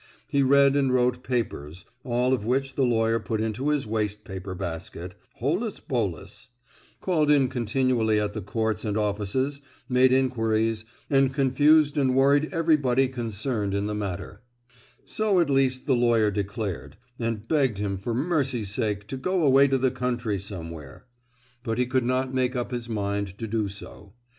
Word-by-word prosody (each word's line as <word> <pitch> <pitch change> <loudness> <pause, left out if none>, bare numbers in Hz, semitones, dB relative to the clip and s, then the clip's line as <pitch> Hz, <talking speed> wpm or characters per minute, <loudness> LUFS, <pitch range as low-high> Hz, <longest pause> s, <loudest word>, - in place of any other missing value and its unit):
He 140 - +1
read 140 +1 +5
and 135 -2 +2
wrote 125 0 +2
papers—all 120 - -2
of 120 -6 -1
which 135 +4 0
the 135 - -1
lawyer 115 -2 +2
put 110 0 -3
into 110 +6 -1
his 150 -3 0
waste 105 -1 -2
paper 95 -1 -7
basket—holus 100 - -4
bolus; 115 - -4 0.5
called 155 -5 +1
in 140 -3 +5
continually 120 -2 +1
at 105 -1 -2
the 110 - -4
courts 110 +2 -2
and 105 -1 -1
offices, 105 +7 -1 0.3
made 125 0 +4
inquiries, 115 -4 +1 0.2
and 135 -1 +3
confused 145 +3 +3
and 130 -2 +2
worried 140 +3 +4
everybody 145 -6 +2
concerned 115 -4 -3
in 100 0 -1
the 105 - -2
matter; 100 -1 -5 0.6
so 215 -4 +1
at 165 -5 +2
least 130 -1 +1
the 135 - +2
lawyer 120 -3 +3
declared, 100 -1 -4 0.2
and 115 -2 -3
begged 135 -8 +1
him 100 -1 -2
for 115 +4 -3
mercy's 135 - 0
sake 105 -1 -1
to 135 - -6
go 185 +6 0
away 135 0 +6
to 135 -1 +2
the 130 0 +1
country 120 -5 -2
somewhere. 85 -7 -8 0.6
But 115 -1 -3
he 125 - +2
could 130 0 0
not 130 +1 0
make 130 0 0
up 120 +1 -3
his 120 -1 -4
mind 100 -3 -2
to 115 - -4
do 110 -1 -1
so. 100 0 -10
120 Hz, 160 wpm, -26 LUFS, 105-135 Hz, 0.6 s, away